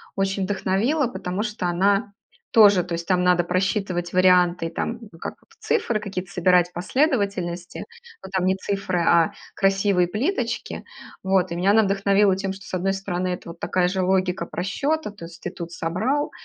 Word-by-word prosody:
очень 195 0 0
вдохновила, 205 +9 0
потому 190 -3 -4
что 210 -4 -3
она 200 +4 +1 0.4
тоже, 205 -5 +6
то 175 - -6
есть 170 0 -4
там 180 -1 +2
надо 180 -1 +4
просчитывать 185 -1 -1
варианты, 180 -2 +4
там 230 +7 -4 0.2
как - - -5 0.2
цифры 240 - 0
какие-то 190 -3 -6
собирать, 180 0 +3
последовательности, 195 - -1 0.4
но 190 - -8
там 190 -2 0
не 190 0 +2
цифры, 190 -2 -2
а 170 -1 +3 0.2
красивые 195 -2 +2
плиточки. 235 - -2 0.4
Вот, 190 -1 +1
и - - -2
меня 185 +3 +2
она 220 +1 +5
вдохновила 195 0 +3
тем, 195 0 -3
что, 195 +2 -12
с - - -11
одной 190 +2 0
стороны, 185 -2 -3
это 180 -1 -4
вот 170 - -10
такая 180 -1 +1
же 190 0 -1
логика 185 -1 +1
просчета, 275 - -2
то 200 -5 -10
есть 165 0 -13
ты 175 - -3
тут 170 -2 -7
собрал, 215 - -1
190 Hz, 170 wpm, -23 LUFS, 180-205 Hz, 0.4 s, тоже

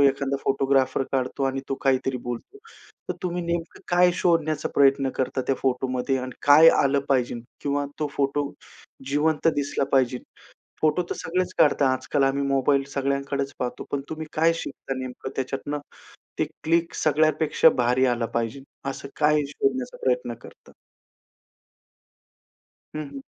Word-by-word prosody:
एखादा 140 0 +2
फोटोग्राफर 135 -1 +2
काढतो 130 +1 -1
आणि 135 0 -1
तो 135 - 0
काहीतरी 135 -1 +1
बोलतो. 120 - -6 0.5
तर - - -1
तुम्ही 180 -1 -2
नेमकं 170 0 -3
काय 180 0 +5
शोधण्याचा 160 -4 +1
प्रयत्न 135 -1 +4
करतात 130 0 -1
त्या 135 - +2
फोटोमध्ये 130 0 0
आणि 130 0 -5
काय 150 +3 +9
आलं 140 0 +3
पाहिजे? 125 -3 +1 0.2
किंवा 145 0 -1
तो 155 - 0
फोटो 140 +1 0 0.6
जिवंत 150 +2 +2
दिसला 145 -1 0
पाहिजे. 130 -2 +2 0.6
फोटो 155 +3 +3
तर - - -2
सगळेच 180 +2 -1
काढतात. 145 -2 +4
आजकाल 140 +2 -1
आम्ही 135 +1 +1
मोबाईल 140 0 +2
सगळ्यांकडेच 140 0 -1
पाहतो. 125 -1 -3
पण 140 -1 -1
तुम्ही 160 0 -5
काय 165 +2 +3
शिकता 135 -4 -5
नेमकं 130 0 -6
त्याच्यातनं. 135 +2 -3 0.6
ते - - +3 0.2
क्लिक 165 +1 +1
सगळ्यापेक्षा 155 +1 +3
भारी 125 +2 +3
आला 120 -2 +1
पाहिजे, 115 +3 -2 0.3
असं 140 - -6
काय 150 0 +4
शोधण्याचा 130 -2 -1
प्रयत्न 125 -2 +1
करता? - - -15 2.3
हं, 155 -1 -4
हं. 135 -1 -8
140 Hz, 140 wpm, -25 LUFS, 130-150 Hz, 2.3 s, काय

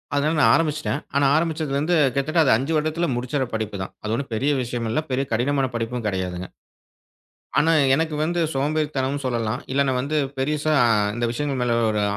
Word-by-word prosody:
அதனால 150 +3 +1
நான் - - +6
ஆரம்பிச்சிட்டேன். 150 -2 -1
ஆனா 140 0 +3
ஆரம்பிச்சதுல 160 -3 0
இருந்து 160 +5 +1 0.2
கிட்டத்தட்ட 145 +5 0
அது 135 - +3
5 135 +6 -3
வருடத்துல 155 +3 0
முடிச்சிற 130 +3 -1
படிப்பு 110 -2 -3
தான். 95 - -5
அது 110 0 -2
ஒண்ணும் 135 +1 -5
பெரிய 140 +6 +1
விஷயம் 120 -1 -3
இல்ல. 115 - 0
பெரிய 135 +2 0
கடினமான 135 +4 +1
படிப்பும் 115 0 -3
கிடையாதுங்க. 90 -2 -3 1.1
ஆனா 160 +3 +4 0.2
எனக்கு 160 +2 0
வந்து 175 +2 -1
சோம்பேறித்தனமும் 145 -1 -1
சொல்லலாம். 115 -2 -1
இல்லனா 140 0 +2
வந்து 145 +4 -2 0.2
பெருசா 150 +3 0 0.4
இந்த 120 +1 -2
விஷயங்கள் 140 +1 -2
மேல 120 -1 +1
ஒரு 105 -1 0
140 Hz, 170 wpm, -23 LUFS, 120-155 Hz, 1.1 s, நான்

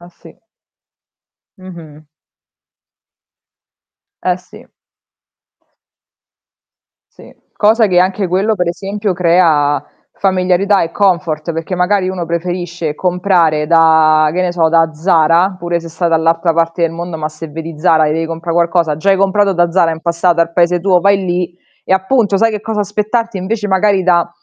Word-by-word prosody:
Ah, 175 - -14
sì. 170 -1 -19 1.2
Mh-mh. 165 -5 -13 2.2
Eh, 180 -1 +1
sì. 180 0 -17 2.5
Sì. - - -16 0.2
Cosa 220 +2 +2
che 180 -3 +1
anche 190 +1 0
quello, 195 +5 0
per 180 -3 -2
esempio, 200 +3 -3
crea 165 -5 +2 0.3
familiarità 190 +1 +1
e 165 - -3
comfort, 170 -5 -1
perché 165 +3 -4
magari 185 +1 0
uno 180 -3 -4
preferisce 170 -2 -4
comprare 175 -4 0
da, 160 -1 +4
che 180 - -1
ne 180 - -1
so, 165 -2 +1
da 165 -1 +2
Zara, 165 +3 +2
pure 175 -1 -2
se 165 - -10
sta 165 +2 -3
dall'altra 165 +1 +1
parte 165 +1 -1
del 165 - +1
mondo, 170 0 -6
ma 155 0 -4
se 155 +1 -10
vedi 160 0 -8
Zara 160 -2 +3
e 150 - 0
devi 165 +1 -2
comprà 165 +1 -5
qualcosa, 170 -2 +1
già 195 +6 0
hai 195 - +3
comprato 195 +1 +1
da 175 0 +1
Zara 170 -2 +2
in 160 - -7
passato 170 0 0
ar 170 0 0
paese 175 0 +1
tuo, 180 -1 +2
vai 200 +1 +3
lì 175 -1 -3 0.3
e - - -1
appunto 200 +2 +1
sai 225 +3 +2
che 210 -1 -4
cosa 220 -1 -3
aspettarti, 210 +2 -2
invece 210 +3 -3
magari 195 0 +2
da 175 -2 +2
175 Hz, 155 wpm, -14 LUFS, 165-190 Hz, 2.5 s, da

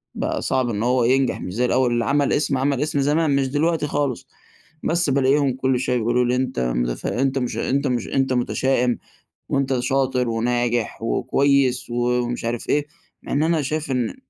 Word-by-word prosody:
بقى - - -2
صعب 130 -2 0
إنه 110 0 -2
هو 125 0 +2
ينجح 130 +2 +1
مش 90 - -6
زي 125 +3 +1
الأول. 125 0 +2
اللي 120 0 0
عمل 145 0 +1
اسم، 145 -2 +1
عمل 135 0 0
اسم 150 -1 0
زمان 150 +1 +2
مش 135 -1 +1
دلوقتي 150 +3 0
خالص". 140 -4 -2 0.6
بس 170 -2 +1
بالاقيهم 135 0 +2
كل 130 -1 0
شوية 125 -1 0
يقول 120 +2 +1
لي: 125 - +1
"أنت 130 - -2
متف - - -1
أنت 135 +2 0
مش 125 -2 -2
أنت 140 +1 0
مش 125 -2 -1
أنت 135 -1 0
متشائم، 125 0 +1 0.5
وأنت 135 -2 0
شاطر 130 -2 0
وناجح 120 0 -1
وكويس" 135 +1 +1
ومش 120 0 -1
عارف 120 0 -3
إيه، 145 0 +2 0.4
مع - - -8
إن 145 +2 +2
أنا 165 -1 +2
شايف 150 +1 -3
إن 125 -3 -1
130 Hz, 180 wpm, -22 LUFS, 120-140 Hz, 0.6 s, هو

